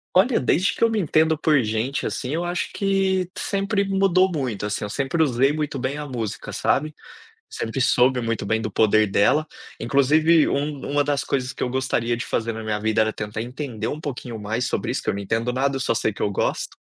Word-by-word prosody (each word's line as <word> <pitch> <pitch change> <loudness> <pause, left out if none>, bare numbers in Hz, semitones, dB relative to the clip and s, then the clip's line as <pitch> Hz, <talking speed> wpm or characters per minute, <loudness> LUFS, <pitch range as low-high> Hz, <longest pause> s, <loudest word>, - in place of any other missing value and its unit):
Olha, 225 +7 +4
desde 170 +9 +2
que - - -2
eu 230 - +5
me 220 -1 0
entendo 160 -2 +2
por 150 -3 +3
gente, 110 +6 -2
assim, 130 +2 -4
eu 170 +2 -1
acho 175 0 -2
que 190 -2 +1
sempre 200 +1 0
mudou 190 -1 +3
muito, 125 -9 -2
assim, 105 0 -3
eu 105 - -4
sempre 140 +7 -1
usei 135 0 +3
muito 150 -2 -3
bem 130 +3 -2
a 150 -1 -5
música, 115 -5 -5
sabe. 155 +2 0 0.5
Sempre 115 +4 -4
soube 125 0 +3
muito 115 -2 -2
bem 110 0 +1
do 110 -3 -4
poder 110 0 +4
dela. 105 +10 +2 0.3
Inclusive, 150 +6 +4
um 145 -1 -2
uma 145 0 +2
das 145 -1 0
coisas 130 -1 -2
que - - -11
eu 125 - 0
gostaria 120 -2 0
de - - -4
fazer 115 0 -1
na 110 0 -6
minha 105 -1 -2
vida 110 +1 +1
era 110 0 +1
tentar 105 +1 -5
entender 125 -3 -5
um 150 - -4
pouquinho 125 -5 -6
mais 110 +4 -2
sobre - - -2
isso, - - -3
que - - -1
eu - - +1
não 100 - -4
entendo 115 +4 -1
nada, 135 +1 0
só 125 - 0
sei 110 -1 0
que - - -9
eu 100 - +1
gosto. - - -2
135 Hz, 220 wpm, -23 LUFS, 115-155 Hz, 0.5 s, eu